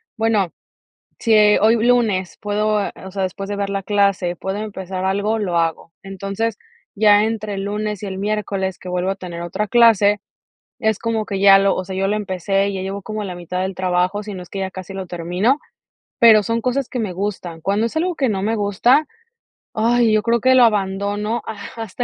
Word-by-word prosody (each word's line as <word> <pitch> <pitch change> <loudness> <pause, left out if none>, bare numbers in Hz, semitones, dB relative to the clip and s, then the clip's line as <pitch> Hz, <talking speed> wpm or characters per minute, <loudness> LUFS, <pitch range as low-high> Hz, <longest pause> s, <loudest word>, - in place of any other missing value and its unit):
"Bueno, 220 -6 +1 0.7
si 225 -2 +2 0.2
hoy 220 +2 +4
lunes 220 -7 +1
puedo, 210 0 0
eh, - - -6
o 190 - -8
sea, 195 0 -2
después 195 +1 -5
de 205 - -2
ver 200 -1 -2
la 195 0 -2
clase, 200 -3 +1
puedo 190 +2 -4
empezar 190 -3 -5
algo, 200 +3 0
lo 180 -5 0
hago". 165 0 -2
Entonces, 195 +3 -3 0.4
ya 210 0 +5
entre 215 -2 -3
el 195 0 -4
lunes 210 0 -3
y - - -4
el 190 - -5
miércoles 200 -2 -2
que 185 - -10
vuelvo 180 +1 -1
a 195 - -2
tener 175 -3 -7
otra 190 +5 -3
clase, 210 -4 +5 0.6
es 220 -2 0
como 225 -2 -1
que 195 -1 -3
ya 195 0 +7
lo, 195 0 +2
o 185 - -3
sea, 190 0 -6
yo 195 +1 0
lo 210 +2 0
empecé, 195 0 -1
ya 190 - -4
llevo 195 +1 -4
como 215 +1 -4
la 185 -3 -5
mitad 175 +1 -4
del 190 +1 -2
trabajo, 185 +2 0
si 210 -1 -7
no 185 - -7
es 180 - -12
que 195 - -6
ya 190 - -2
casi 185 +1 -8
lo 190 -1 -5
termino, 180 - 0 0.6
pero 220 -3 +7
son 230 +1 -1
cosas 255 +2 -1
que 250 - -3
me 205 -5 -2
gustan. 180 -3 -4
Cuando 200 +6 0
es 235 - -7
algo 355 +2 0
que 275 -5 0
no 195 -3 -1
me 220 +3 0
gusta, 225 +8 +2 0.7
ay, 230 +1 +2
yo 215 0 +3
creo 235 0 +1
que 260 +3 +4
lo 255 - +7
abandono 205 +2 -1 0.4
hasta 225 +1 -4
200 Hz, 210 wpm, -20 LUFS, 190-220 Hz, 0.7 s, ya